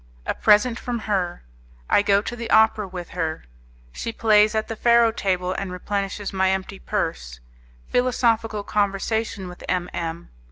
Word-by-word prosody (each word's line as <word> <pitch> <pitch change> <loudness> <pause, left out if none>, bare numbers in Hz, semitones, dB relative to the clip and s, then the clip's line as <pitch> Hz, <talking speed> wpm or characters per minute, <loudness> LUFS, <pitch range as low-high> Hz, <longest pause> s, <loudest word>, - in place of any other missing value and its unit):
A - - 0
Present 225 +3 +3
From 245 -1 -3
Her 195 -5 -2 0.4
I - - +4
Go 200 0 +3
to 240 - -5
the 235 -1 -6
Opera 220 -2 +4
With 180 -2 -7
Her 160 -3 -3 0.5
She 230 - -4
Plays 215 -1 +4
At 220 - 0
the 225 - -4
Faro 235 0 +4
Table 185 -4 -1
and 190 -1 -4
Replenishes 200 +2 -3
My 190 0 +2
Empty 190 +1 -3
Purse - - -3 0.5
Philosophical 230 -4 +1
Conversation 205 0 -1
With 180 0 -11
M. 180 -1 -1
M. 170 0 -5
205 Hz, 155 wpm, -23 LUFS, 185-220 Hz, 0.5 s, I